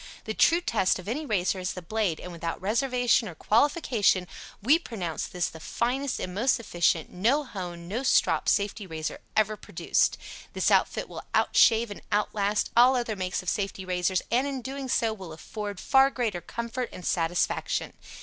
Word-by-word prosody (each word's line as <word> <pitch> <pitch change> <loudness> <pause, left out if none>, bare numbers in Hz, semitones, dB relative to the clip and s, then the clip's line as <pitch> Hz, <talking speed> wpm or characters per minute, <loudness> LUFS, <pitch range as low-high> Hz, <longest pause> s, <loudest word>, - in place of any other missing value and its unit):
The - - -4
true 340 +1 +4
test 215 - +1
of 185 - -10
any 290 +7 -3
razor 190 -3 0
is 180 0 -2
the 180 - -7
blade, 200 -3 -1
and 180 - -8
without 165 -1 -4
reservation 245 +3 +2
or 170 - -10
qualification, 225 - +2 0.3
we 280 +10 +4
pronounce 180 - -4
this 180 -2 -1
the 160 - -10
finest 255 - -2
and 180 - -4
most 235 +6 +2
efficient 175 -6 0
"No 240 +11 +2
Hone, 175 -8 -7
No 220 +7 -2
Strop" 270 - +2
Safety 200 0 0
Razor 160 -2 -5
ever 215 0 +2
produced. 210 - 0 0.4
This - - +1
outfit - - +2
will - - -8
out - - +2
shave 230 -1 +5
and 205 - -8
out 210 0 +1
last 205 0 0
all 250 +3 +6
other 235 -3 -1
makes 185 -1 -3
of 180 - -1
safety 195 -2 -2
razors 180 0 0
and, 255 +4 +2
in 270 -3 -4
doing 270 +1 -5
so, 225 -2 +1
will 190 -6 -9
afford 205 +4 -6
far 270 +4 +5
greater 225 -9 -2
comfort 235 +4 -4
and 180 - -9
satisfaction. 170 +1 0
210 Hz, 180 wpm, -27 LUFS, 180-245 Hz, 0.4 s, all